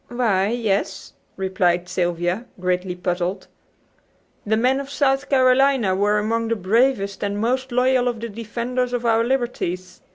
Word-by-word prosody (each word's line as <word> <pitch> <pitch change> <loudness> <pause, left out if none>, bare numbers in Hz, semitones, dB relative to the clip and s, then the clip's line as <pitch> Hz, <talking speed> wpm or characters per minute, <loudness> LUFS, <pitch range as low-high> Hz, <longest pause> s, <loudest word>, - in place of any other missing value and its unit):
"Why, 220 -6 +1
yes," 220 -3 -2 0.2
replied 185 -2 0
Sylvia, 175 +4 -1
greatly 180 0 -1
puzzled. 180 +1 -2 1.0
"The 220 +1 +2
men 255 +4 +2
of 275 0 -6
South 275 -1 0
Carolina 260 -5 +3
were 205 +2 +2
among 225 +2 0
the 230 - 0
bravest 205 0 +1
and 205 0 -2
most 255 +4 -1
loyal 250 0 +2
of 240 -2 -2
the 235 +1 -5
defenders 235 +3 -3
of 245 -1 -2
our 230 0 +3
liberties. 210 -8 -2
225 Hz, 140 wpm, -22 LUFS, 190-250 Hz, 1.0 s, Carolina